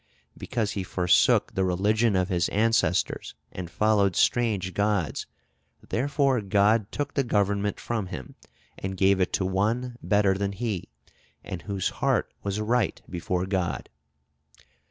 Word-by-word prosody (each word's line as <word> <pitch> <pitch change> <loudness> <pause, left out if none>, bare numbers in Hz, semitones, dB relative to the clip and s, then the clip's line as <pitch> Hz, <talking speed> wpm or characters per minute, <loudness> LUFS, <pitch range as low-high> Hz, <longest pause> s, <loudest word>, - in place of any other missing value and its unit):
Because 110 -4 -2
he 100 - -3
forsook 90 -1 +3
the 95 - 0
religion 105 +4 +2
of 95 0 +1
his 90 -3 +1
ancestors 110 -4 +1 0.2
and 90 -2 -6
followed 100 -1 +2
strange 105 -6 +1
gods, 100 -7 0 0.6
therefore 135 -1 +1
God 100 +2 +2
took 145 0 -3
the 140 - +1
government 100 -3 0
from 110 -5 -3
him, 65 -8 -8 0.5
and 95 0 -4
gave 95 0 +4
it 90 - +1
to 95 - +1
one 115 +6 -1
better 100 +1 +3
than 100 0 -2
he, 105 -4 -3 0.5
and 90 - -6
whose 95 +4 -2
heart - - +1
was 100 +1 -2
right 115 0 0
before 90 +1 -2
God." 95 -2 -2
100 Hz, 135 wpm, -26 LUFS, 95-110 Hz, 0.6 s, gave